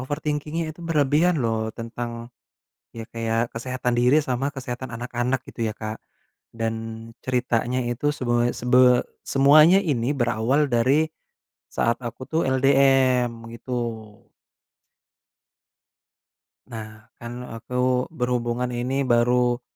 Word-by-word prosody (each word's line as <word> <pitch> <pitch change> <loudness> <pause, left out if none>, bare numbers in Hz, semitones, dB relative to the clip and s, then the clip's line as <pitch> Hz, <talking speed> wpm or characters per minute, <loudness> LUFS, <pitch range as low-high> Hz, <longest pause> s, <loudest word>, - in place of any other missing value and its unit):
overthinking-nya 150 +3 -3
itu - - -14
berlebihan 155 +1 +2
loh, 110 -2 -1
tentang, 115 0 -6 0.7
ya 115 - -6
kayak 115 0 -1
kesehatan 125 0 -2
diri 130 +5 +4
sama 130 0 -1
kesehatan 125 -1 -6
anak-anak 120 +2 -2
gitu 115 -2 -4
ya 110 - -4
Kak. 110 0 -6 0.6
Dan 115 0 -4
ceritanya 125 -1 0
itu 120 +5 -1
seboe 120 -2 +1
sebe 125 0 +4 0.2
semuanya 150 +6 +6
ini 135 - 0
berawal 120 +4 +1
dari 130 +6 +3 0.7
saat 115 0 +1
aku 120 +1 -7
tuh 160 +1 +1
LDM, 130 -2 +3 0.2
gitu. 125 +2 -6 3.0
Nah, 110 -1 -9 0.2
kan 120 +1 -7
aku 125 +3 -1
berhubungan 125 -3 -2
ini 130 +3 -1
baru 120 0 +2
125 Hz, 105 wpm, -24 LUFS, 115-135 Hz, 3.0 s, semuanya